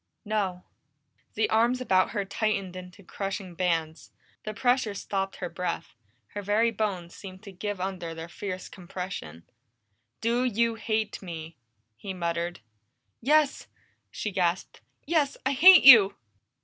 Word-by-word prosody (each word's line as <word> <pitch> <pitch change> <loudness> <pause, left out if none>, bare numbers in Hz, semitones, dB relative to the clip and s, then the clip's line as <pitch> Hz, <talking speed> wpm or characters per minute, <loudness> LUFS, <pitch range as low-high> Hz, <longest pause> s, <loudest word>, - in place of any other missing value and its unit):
"No." 195 -4 -2 0.7
The 215 0 +2
arms 235 +3 +3
about 185 -7 +2
her 205 -3 -3
tightened 195 -2 -2
into 185 +2 -10
crushing 195 -1 -5
bands. 165 -3 -2 0.4
The 215 - -4
pressure 245 -3 +1
stopped 195 -1 -3
her 180 - -5
breath; 175 -7 -4 0.4
her 205 - -6
very 210 +4 +2
bones 195 -6 -3
seemed 190 0 -11
to 200 - -10
give 200 +1 -5
under 180 -3 -4
their 165 0 -7
fierce 185 +1 -6
compression. 175 - -7 0.8
"Do 235 +2 +1
you 230 -1 +1
hate 220 -1 -2
me?" 165 -3 -8 0.4
he 190 +9 -6
muttered. 170 -2 -3 0.6
"Yes!" 295 +2 +2 0.4
she 210 - -4
gasped. 180 -1 -1 0.2
"Yes! 300 -3 +1
I 265 - +2
hate 350 +7 +8
you!" 225 -7 +9
195 Hz, 135 wpm, -27 LUFS, 180-225 Hz, 0.8 s, you